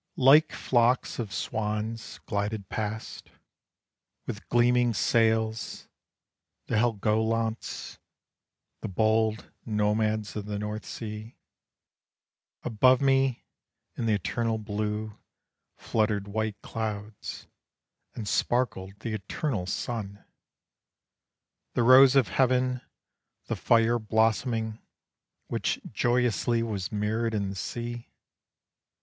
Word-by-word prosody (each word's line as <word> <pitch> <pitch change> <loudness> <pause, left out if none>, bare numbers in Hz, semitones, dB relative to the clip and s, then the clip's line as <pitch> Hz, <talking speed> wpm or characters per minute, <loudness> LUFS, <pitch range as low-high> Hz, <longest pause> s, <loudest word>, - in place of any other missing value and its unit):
Like 145 +5 +6
flocks 120 0 +1
of 110 -4 -3
swans 110 +2 -3
glided 105 -1 -2
past, 110 0 -5 1.0
With - - -7
gleaming 120 -1 +3
sails, 110 0 +1 0.8
the - - -5
Helgolands, 110 0 0 0.8
The - - -4
bold 110 +2 +1
nomads 105 0 0
of 105 -1 -4
the 105 -1 -3
North 105 +1 -4
Sea. 110 0 -7 1.3
Above 125 +3 +4
me 135 -2 +2 0.5
in 115 - -2
the 110 - +3
eternal 115 +3 -1
blue 105 0 -3 0.6
Fluttered 105 -2 0
white 110 0 -2
clouds, 110 -2 -5 0.7
And 110 - -5
sparkled 100 -3 0
the 115 - -3
eternal 105 - -3
sun, 100 -1 -4 1.5
The 120 - +3
Rose 130 +2 +8
of 130 -8 +4
heaven, 125 +2 +2 0.6
the - - -2
fire 115 0 +3
blossoming, 110 +1 +1 0.7
Which - - -1
joyously 120 -1 +1
was 100 -5 -3
mirrored 110 +2 -1
in 100 -2 -1
the 100 - -6
sea. 120 +4 -5
110 Hz, 95 wpm, -28 LUFS, 105-120 Hz, 1.5 s, Rose